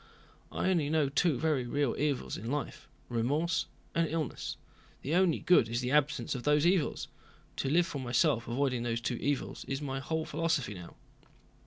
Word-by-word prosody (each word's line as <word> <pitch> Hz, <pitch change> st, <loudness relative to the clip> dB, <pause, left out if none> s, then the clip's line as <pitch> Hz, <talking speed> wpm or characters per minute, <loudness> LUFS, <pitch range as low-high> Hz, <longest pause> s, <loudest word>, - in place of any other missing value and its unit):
"I 190 Hz, -, 0 dB
only 160 Hz, -6 st, +1 dB
know 155 Hz, -3 st, +2 dB
two 145 Hz, 0 st, +2 dB
very 140 Hz, -3 st, 0 dB
real 145 Hz, 0 st, 0 dB
evils 145 Hz, -3 st, -1 dB
in 115 Hz, +4 st, -5 dB
life: 145 Hz, +1 st, -4 dB, 0.2 s
remorse 145 Hz, +9 st, 0 dB, 0.3 s
and 165 Hz, 0 st, +2 dB
illness. 155 Hz, -4 st, -3 dB, 0.5 s
The 145 Hz, -, -2 dB
only 180 Hz, -2 st, +4 dB
good 175 Hz, -11 st, +4 dB
is 120 Hz, +2 st, -1 dB
the 125 Hz, 0 st, -2 dB
absence 150 Hz, +2 st, +2 dB
of 125 Hz, -, -4 dB
those 150 Hz, +3 st, +3 dB
evils. 175 Hz, -4 st, +1 dB, 0.5 s
To 135 Hz, -, -1 dB
live 170 Hz, +4 st, +4 dB
for 150 Hz, -6 st, -5 dB
myself 120 Hz, -2 st, +1 dB
avoiding 125 Hz, 0 st, 0 dB
those 115 Hz, -1 st, -1 dB
two 120 Hz, +1 st, -2 dB
evils 140 Hz, +2 st, -2 dB
is 135 Hz, -, -3 dB
my 135 Hz, -2 st, -3 dB
whole 160 Hz, +3 st, -2 dB
philosophy 155 Hz, -7 st, -1 dB
now." 90 Hz, -3 st, -10 dB
145 Hz, 175 wpm, -31 LUFS, 125-160 Hz, 0.5 s, only